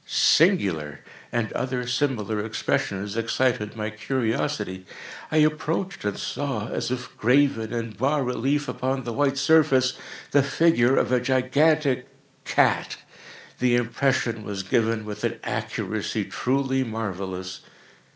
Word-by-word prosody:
"singular!" 95 Hz, -, +3 dB, 0.3 s
and 115 Hz, -2 st, -1 dB
other 125 Hz, -1 st, -2 dB
similar 120 Hz, -5 st, -1 dB
expressions, 105 Hz, -2 st, -2 dB
excited 115 Hz, -1 st, 0 dB
my 110 Hz, -1 st, -3 dB
curiosity. 110 Hz, -4 st, -2 dB, 0.5 s
I 155 Hz, -, +1 dB
approached 155 Hz, +5 st, 0 dB
and 105 Hz, -1 st, -2 dB
saw, 135 Hz, -7 st, -3 dB
as -, -, -2 dB
if 125 Hz, 0 st, -5 dB
graven 125 Hz, -2 st, +2 dB
in 115 Hz, -1 st, -3 dB
bas 135 Hz, +8 st, 0 dB
relief 135 Hz, +4 st, 0 dB
upon 130 Hz, +1 st, -2 dB
the 120 Hz, 0 st, -4 dB
white 140 Hz, +1 st, +1 dB
surface, 140 Hz, -4 st, +3 dB, 0.3 s
the 145 Hz, -, +5 dB
figure 140 Hz, -3 st, +3 dB
of -, -, +2 dB
a 125 Hz, -, +4 dB
gigantic 130 Hz, +1 st, +2 dB, 0.4 s
cat. -, -, +2 dB, 0.6 s
The 125 Hz, -1 st, +3 dB
impression 120 Hz, -1 st, 0 dB
was 100 Hz, -2 st, -4 dB
given 110 Hz, +2 st, 0 dB
with 105 Hz, -1 st, -7 dB
an -, -, -1 dB
accuracy -, -, -3 dB
truly 135 Hz, 0 st, 0 dB
marvellous. 95 Hz, -5 st, -5 dB
125 Hz, 120 wpm, -25 LUFS, 110-135 Hz, 0.6 s, the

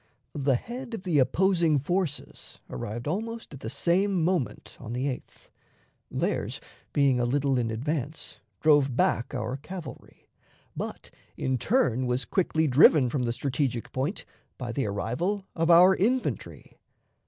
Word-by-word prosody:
The 140 Hz, -2 st, +1 dB
head 240 Hz, -, -5 dB
of 190 Hz, -, -8 dB
the 170 Hz, -6 st, +2 dB
opposing 165 Hz, +3 st, +3 dB
forces 165 Hz, +1 st, -3 dB
arrived 110 Hz, -, -5 dB
almost 225 Hz, +4 st, -4 dB
at 140 Hz, -, -9 dB
the 110 Hz, -, -5 dB
same 180 Hz, -, +1 dB
moment 175 Hz, -6 st, -1 dB
on 115 Hz, -2 st, -7 dB
the 125 Hz, +2 st, -1 dB
8th; 135 Hz, -3 st, -6 dB, 0.6 s
theirs, -, -, -2 dB, 0.3 s
being 140 Hz, -3 st, +3 dB
a -, -, +1 dB
little 135 Hz, +1 st, +1 dB
in 115 Hz, -2 st, 0 dB
advance, 145 Hz, +6 st, -3 dB, 0.2 s
drove 145 Hz, -4 st, +4 dB
back 120 Hz, -, +1 dB
our 130 Hz, -, -2 dB
cavalry, 175 Hz, +4 st, -10 dB, 0.5 s
but -, -, -6 dB, 0.3 s
in 130 Hz, -1 st, -1 dB
turn 130 Hz, -, +1 dB
was 125 Hz, +1 st, 0 dB
quickly 160 Hz, -4 st, +1 dB
driven 140 Hz, -1 st, +6 dB
from 140 Hz, -, 0 dB
the 120 Hz, -1 st, 0 dB
strategic 130 Hz, -1 st, -2 dB
point 140 Hz, +10 st, -2 dB, 0.3 s
by 125 Hz, -2 st, -4 dB
the 135 Hz, -1 st, -1 dB
arrival 155 Hz, -, -2 dB
of 165 Hz, 0 st, +1 dB
our 180 Hz, +3 st, +8 dB
infantry. 245 Hz, +6 st, -2 dB
145 Hz, 140 wpm, -27 LUFS, 125-180 Hz, 0.6 s, our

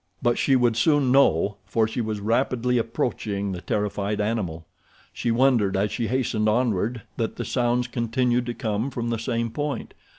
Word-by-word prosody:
But 120 Hz, -2 st, +1 dB
she 135 Hz, -, +3 dB
would 120 Hz, -3 st, +3 dB
soon 140 Hz, +1 st, +3 dB
know, 100 Hz, -7 st, +3 dB
for 110 Hz, +2 st, +2 dB
she 110 Hz, +2 st, -3 dB
was 110 Hz, -2 st, -3 dB
rapidly 125 Hz, +2 st, +1 dB
approaching 105 Hz, -3 st, -2 dB
the 90 Hz, -2 st, -5 dB
terrified 105 Hz, +1 st, -2 dB
animal. 100 Hz, -7 st, -2 dB, 0.5 s
She -, -, -2 dB
wondered 115 Hz, -5 st, +3 dB
as 100 Hz, +2 st, 0 dB
she 115 Hz, -3 st, -2 dB
hastened 110 Hz, -3 st, 0 dB
onward 115 Hz, 0 st, 0 dB
that 115 Hz, -, -2 dB
the -, -, -4 dB
sounds 120 Hz, 0 st, +1 dB
continued 120 Hz, +1 st, 0 dB
to 120 Hz, -, -3 dB
come 110 Hz, +3 st, -2 dB
from 120 Hz, -2 st, -3 dB
the 115 Hz, -, -1 dB
same 115 Hz, 0 st, -2 dB
point. 145 Hz, +1 st, -4 dB
115 Hz, 170 wpm, -24 LUFS, 105-125 Hz, 0.5 s, she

